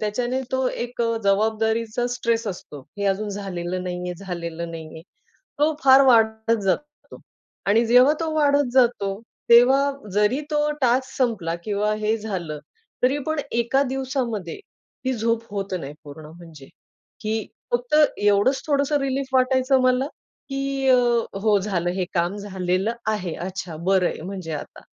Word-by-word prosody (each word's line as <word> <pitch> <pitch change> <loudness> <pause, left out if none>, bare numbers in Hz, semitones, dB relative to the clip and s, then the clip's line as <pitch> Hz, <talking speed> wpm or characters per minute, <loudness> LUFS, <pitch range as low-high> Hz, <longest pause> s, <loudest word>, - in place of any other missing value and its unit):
त्याच्याने 240 +4 -1
तो 260 0 +1
एक 240 -1 -4
अ, 230 0 0
जबाबदारीचा 220 +3 +1
स्ट्रेस 230 -2 -1
असतो 165 -6 -8 0.2
हे 200 - -2
अजून 200 +2 0
झालेलं 185 -3 -4
नाहीये, 180 0 -4
झालेलं 170 -3 -5
नाहीये. 160 -1 -9 0.6
तो 305 +2 +3
फार 270 0 +8
वाढत 225 -2 +3
जातो 195 +10 +1 0.8
आणि 225 +4 +4
जेव्हा 250 +5 +6
तो 325 -1 -2
वाढत 285 -3 +3
जातो, 230 -6 +2 0.3
तेव्हा 265 +4 +6 0.2
जरी 210 +6 +2
तो 300 0 +1
टास्क 255 +1 +2
संपला 215 -10 0
किंवा 210 +1 0
हे 215 +1 0
झालं, 180 -8 -5 0.4
तरी 260 +3 +3
पण 315 -1 -1
एका 235 +3 +1
दिवसामध्ये 255 - -3 0.5
ही 260 - +1
झोप 230 0 0
होत 195 -1 -4
नाही 140 0 -7
पूर्ण 150 +1 -11
म्हणजे. 160 -3 -13 0.5
की 215 0 -2 0.3
फक्त 245 +4 +1 0.2
एवढंच 205 +6 +2
थोडंसं 285 0 +2
रिलीफ 270 0 -1
वाटायचं 260 +1 +3
मला 255 +1 +2 0.4
की 275 0 -2
अ, 255 - +7 0.5
हो 210 -1 +4
झालं 185 -3 -1
हे 185 - 0
काम 175 +2 0
झालेलं 190 0 -1 0.2
आहे, 185 -6 -3
अच्छा, 185 -2 -6
बरं 180 +2 +2
आहे. - - -5
म्हणजे 185 -1 -6
आता 150 - -7
220 Hz, 145 wpm, -23 LUFS, 185-255 Hz, 0.8 s, फार